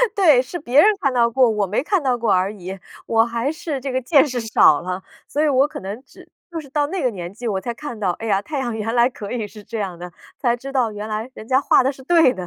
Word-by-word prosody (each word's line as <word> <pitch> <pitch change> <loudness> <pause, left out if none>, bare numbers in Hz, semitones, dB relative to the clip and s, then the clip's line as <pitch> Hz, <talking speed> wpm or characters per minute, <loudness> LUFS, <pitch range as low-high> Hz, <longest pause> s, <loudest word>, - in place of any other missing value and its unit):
对。 395 -2 +1
对， 250 - +5
是 260 +8 -7
别 275 +1 +4
人 425 +3 +5
看 275 -2 +1
到 235 -1 +3
过， 250 0 +4
我 210 -2 0
没 210 +7 -1
看 385 +2 +1
到 255 -2 +1
过 230 -3 0
而 185 +2 +1
已， 190 -1 -7 0.3
我 225 0 +3
还 235 +4 -2
是 310 -3 -4
这 270 +1 -4
个 260 0 -1
见 280 +3 +4
识 250 -3 -3
少 220 -9 +4
了。 185 +2 -4 0.2
所 295 - -1
以 310 - +3
我 275 0 +3
可 - - -8
能 200 +5 -6
只 - - -17 0.2
就 335 - -4
是 290 -3 -11
到 290 +1 0
那 375 +3 -3
个 255 - +3
年 180 -2 -7
纪 235 +3 -6
我 195 -3 -1
才 240 - -4
看 240 -3 -7
到， 190 -4 +1
哎 225 +6 -6
呀， 200 -2 +2
太 290 +6 -4
阳 240 -4 -2
原 225 +1 -2
来 240 +1 +4
可 230 -6 -8
以 225 -4 -3
是 210 0 -13
这 225 +2 -6
样 185 -4 -4
的， 175 0 -8 0.3
才 240 -3 +1
知 270 +3 -8
道 250 -5 +1
原 210 0 -6
来 215 +3 -3
人 220 - -11
家 260 0 +3
画 - - +4
得 265 - +1
是 265 -1 -14
对 325 -3 +4
的。 185 -1 -6
240 Hz, 315 characters per minute, -21 LUFS, 210-275 Hz, 0.3 s, 对